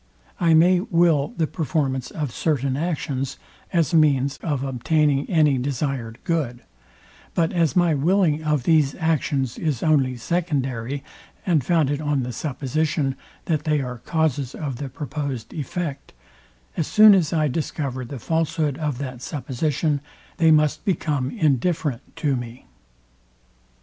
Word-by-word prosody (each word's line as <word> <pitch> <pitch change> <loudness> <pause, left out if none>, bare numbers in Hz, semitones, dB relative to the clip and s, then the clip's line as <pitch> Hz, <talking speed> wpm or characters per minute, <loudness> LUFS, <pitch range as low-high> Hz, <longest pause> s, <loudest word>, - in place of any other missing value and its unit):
I 165 -2 +4
may 175 +3 +5
will 170 -6 +2
the 165 - +2
performance 145 -5 -2
of 150 -5 -4
certain 140 -4 0
actions 140 -4 -2 0.3
as 170 -5 +1
means 140 -3 +3
of 145 -5 -2
obtaining 140 +2 +1
any 150 -6 +3
desired 130 -3 -3
good; 150 -9 -2 0.7
but 165 -1 +1
as 165 -4 +1
my 175 -3 +4
willing 160 +1 +2
of 150 -4 +1
these 155 -2 +3
actions 145 -6 0
is 150 -8 -1
only 135 -5 +2
secondary, 135 -3 -2 0.4
and 165 -7 +2
founded 145 -1 +1
on 145 -3 0
the 125 0 -4
supposition, 145 +1 -1 0.3
that 155 -3 0
they 150 -1 +2
are 125 -3 -5
causes 145 -3 -1
of 140 -6 -4
the 140 +1 -5
proposed 140 -3 -5
effect; 150 -1 -5 0.6
as 160 - -1
soon 215 -1 +8
as 175 -6 +2
I 155 -2 +2
discover 135 -2 -3
the 135 +3 -7
falshood 155 +1 -1
of 150 -5 -2
that 130 -2 -6
supposition, 145 +2 -1 0.4
they 165 -1 +4
must 155 -1 +3
become 150 -8 0
indifferent 150 - -1
to 145 -3 0
me. 120 0 -7
145 Hz, 135 wpm, -23 LUFS, 135-160 Hz, 0.7 s, soon